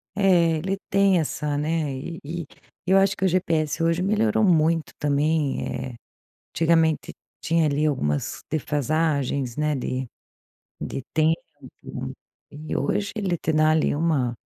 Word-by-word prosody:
Eh, 175 -5 +4
ele 190 +5 -2
tem 195 -2 +4
essa 150 -2 -2
né, 150 -2 -1
eh, 165 +5 -6
eh, 170 +2 -4 0.4
eu 190 +2 +4
acho 195 0 +3
que - - -5
o - - +5
GPS 165 -3 0
hoje 165 +2 +2
melhorou 215 +2 +2
muito 165 -3 +3
também, 150 0 +1
eh, 130 -2 -5 0.6
antigamente 165 -1 +2 0.3
tinha 165 -1 +2
ali 150 +1 +1
algumas 75 - -1
defasagens, 145 -3 0
né, 150 0 +1
de 130 0 -3 0.7
de 135 - -4
tempo 160 +1 +2 1.1
e 150 +1 -6
hoje 200 +8 -1
ele 190 -5 -1
te 160 - -1
dá 155 0 +4
ali, 155 0 +2
uma 145 -6 +1
160 Hz, 135 wpm, -24 LUFS, 145-175 Hz, 1.1 s, o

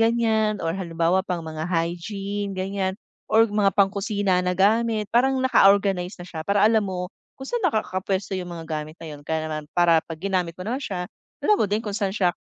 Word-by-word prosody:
ganyan 225 -2 +2
or 165 - 0
halimbawa 170 0 +1
pang 180 -3 -4
mga 160 +1 -5
hygiene 195 +4 -2
gan'yan 190 0 -2 0.3
or 220 +1 +5
mga 210 -2 +2
pang 195 -1 +4
kusina 200 -2 0
na 180 0 -1
gamit 215 +1 +2
parang 265 +3 +3
naka-organize 195 -5 +4
na 175 - -9
siya 165 -3 -7
para 200 +5 +2
alam 220 0 +5
mo, 180 0 -4 0.2
kung 265 - -8
saan 480 - -2
nakakapwesto 195 -2 -2
yung 185 -2 -3
mga 165 - -7 0.2
gamit 155 +1 -10
na 165 - -11
'yun. 145 - -10
Kaya 155 +2 -2
naman 155 -1 -5
para 170 -2 +5
'pag 165 0 -8
ginamit 180 -2 -2
mo 180 - -7
na 250 +6 -2
siya 185 -8 -3 0.4
alam 420 - +5
mo 205 - +2
din 215 +3 -1
kung 205 - -3
saan 200 0 -1
siya 180 -2 +2
195 Hz, 200 wpm, -24 LUFS, 175-210 Hz, 0.4 s, or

